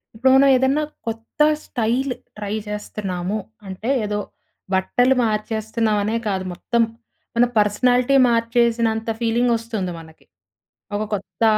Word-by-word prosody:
ఇప్పుడు 260 Hz, +3 st, +3 dB
మనం 275 Hz, +1 st, +6 dB
ఏదన్నా 265 Hz, +4 st, +2 dB, 0.2 s
కొత్త 225 Hz, +5 st, -5 dB, 0.2 s
స్టైల్, 245 Hz, +3 st, 0 dB, 0.2 s
ట్రై 210 Hz, 0 st, -3 dB
జేస్తున్నాము. 205 Hz, -2 st, -3 dB, 0.3 s
అంటే, 190 Hz, +5 st, -5 dB, 0.2 s
ఏదో 210 Hz, 0 st, -2 dB, 0.5 s
బట్టలు 245 Hz, +7 st, +3 dB
మార్చేస్తున్నామనే 220 Hz, 0 st, 0 dB
కాదు, 190 Hz, -2 st, -1 dB
మొత్తం 235 Hz, +6 st, 0 dB, 0.5 s
మన 240 Hz, +1 st, +5 dB
పర్సనాలిటీ 245 Hz, +5 st, +3 dB
మార్చేసినంత 230 Hz, -1 st, +1 dB
ఫీలింగ్ 235 Hz, +1 st, +2 dB
వస్తుంది 220 Hz, -5 st, -4 dB
మనకి. 160 Hz, -1 st, -16 dB, 0.7 s
ఒక 210 Hz, -, -1 dB
కొత్త 210 Hz, +3 st, -4 dB
225 Hz, 110 wpm, -21 LUFS, 210-240 Hz, 0.7 s, మనం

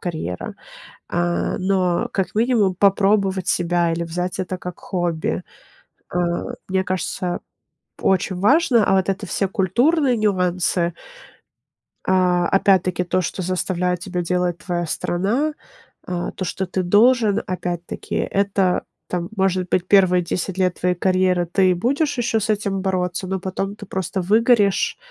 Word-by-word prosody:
карьера, 155 Hz, -, -4 dB, 0.6 s
а, 175 Hz, 0 st, 0 dB
но, 185 Hz, +3 st, +1 dB
как 190 Hz, +1 st, -2 dB
минимум, 220 Hz, -5 st, +2 dB
попробовать 195 Hz, -1 st, +2 dB
себя 175 Hz, -1 st, +1 dB
или 165 Hz, +1 st, -2 dB
взять 180 Hz, +2 st, -3 dB
это 185 Hz, 0 st, -3 dB
как 180 Hz, -1 st, -8 dB
хобби, 175 Hz, -4 st, -2 dB, 0.7 s
а, -, -, -3 dB, 0.5 s
мне 190 Hz, 0 st, 0 dB
кажется, 180 Hz, -1 st, -2 dB, 0.6 s
очень 185 Hz, -1 st, +1 dB
важно. 245 Hz, -, +4 dB
А 195 Hz, -, +3 dB
вот 190 Hz, 0 st, +1 dB
это 195 Hz, +2 st, -2 dB
все 195 Hz, +2 st, 0 dB
культурные 245 Hz, -, +2 dB
нюансы 180 Hz, -4 st, +1 dB, 1.1 s
А, 180 Hz, -2 st, +3 dB
опять-таки 185 Hz, -2 st, +2 dB
то, 185 Hz, +1 st, 0 dB
что 185 Hz, +2 st, -3 dB
заставляет 180 Hz, 0 st, -1 dB
тебя 180 Hz, -1 st, -3 dB
делать 180 Hz, 0 st, -1 dB
твоя 175 Hz, -3 st, -3 dB
страна, 210 Hz, -, -1 dB, 0.5 s
а, 175 Hz, -1 st, -3 dB
то, 185 Hz, -, -5 dB
что 190 Hz, +2 st, -3 dB
ты 185 Hz, +1 st, -2 dB
должен, 220 Hz, +2 st, +4 dB
опять-таки 175 Hz, -1 st, -4 dB
это, 195 Hz, -2 st, +1 dB, 0.2 s
там, 175 Hz, -1 st, -3 dB
может 185 Hz, -1 st, +1 dB
быть, 185 Hz, 0 st, +1 dB
первые 185 Hz, -3 st, +4 dB
10 180 Hz, +2 st, -3 dB
лет 185 Hz, -1 st, 0 dB
твоей 180 Hz, 0 st, +2 dB
карьеры 185 Hz, -1 st, +1 dB
ты 185 Hz, +1 st, +3 dB
будешь 280 Hz, -, 0 dB
еще 230 Hz, -2 st, +1 dB
с 215 Hz, -, -2 dB
этим 200 Hz, -2 st, -1 dB
бороться, 185 Hz, -1 st, -1 dB
но 190 Hz, +1 st, -2 dB
потом 195 Hz, +2 st, -3 dB
ты 205 Hz, -, -10 dB
просто 190 Hz, 0 st, -3 dB
выгоришь. 215 Hz, 0 st, +3 dB
185 Hz, 140 wpm, -21 LUFS, 180-200 Hz, 1.1 s, важно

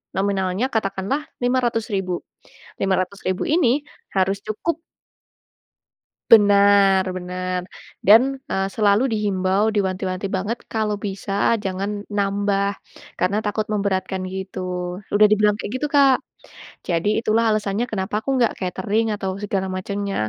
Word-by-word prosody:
nominalnya 195 Hz, +3 st, 0 dB
katakanlah 195 Hz, +6 st, -1 dB, 0.2 s
Rp500.000. 225 Hz, -7 st, 0 dB, 0.7 s
Rp500.000 185 Hz, 0 st, -1 dB
ini 290 Hz, -2 st, +2 dB, 0.3 s
harus 195 Hz, +1 st, +1 dB
cukup 300 Hz, +10 st, -2 dB, 1.5 s
Benar 200 Hz, -2 st, +6 dB
benar. 180 Hz, 0 st, -3 dB, 0.5 s
Dan, 220 Hz, +4 st, +9 dB, 0.3 s
eee, 195 Hz, 0 st, 0 dB
selalu 210 Hz, +1 st, +3 dB
dihimbau, 200 Hz, 0 st, +1 dB
diwanti-wanti 190 Hz, -1 st, -1 dB
banget. 210 Hz, +5 st, -2 dB
Kalau 215 Hz, -2 st, 0 dB
bisa, 195 Hz, 0 st, -5 dB, 0.3 s
jangan 200 Hz, +2 st, -3 dB
nambah, 200 Hz, 0 st, +1 dB, 0.5 s
karena 185 Hz, +4 st, +1 dB
takut 215 Hz, 0 st, -1 dB
memberatkan, 190 Hz, -2 st, -1 dB
gitu. 190 Hz, 0 st, -5 dB, 0.5 s
Sudah 210 Hz, +1 st, +4 dB
dibilang 210 Hz, 0 st, +3 dB
kayak 210 Hz, -, -6 dB
gitu, 300 Hz, -, 0 dB
Kak. 275 Hz, -2 st, +5 dB, 0.7 s
Jadi 170 Hz, +2 st, 0 dB, 0.2 s
itulah 225 Hz, +2 st, +2 dB
alasannya 210 Hz, +2 st, -1 dB
kenapa 205 Hz, 0 st, -1 dB
aku 245 Hz, -, -6 dB
nggak 235 Hz, -3 st, +2 dB
katering 210 Hz, +4 st, -1 dB
atau 195 Hz, -1 st, -3 dB
segala 195 Hz, -2 st, -1 dB
macamnya. 200 Hz, +1 st, -3 dB
200 Hz, 110 wpm, -22 LUFS, 190-215 Hz, 1.5 s, Dan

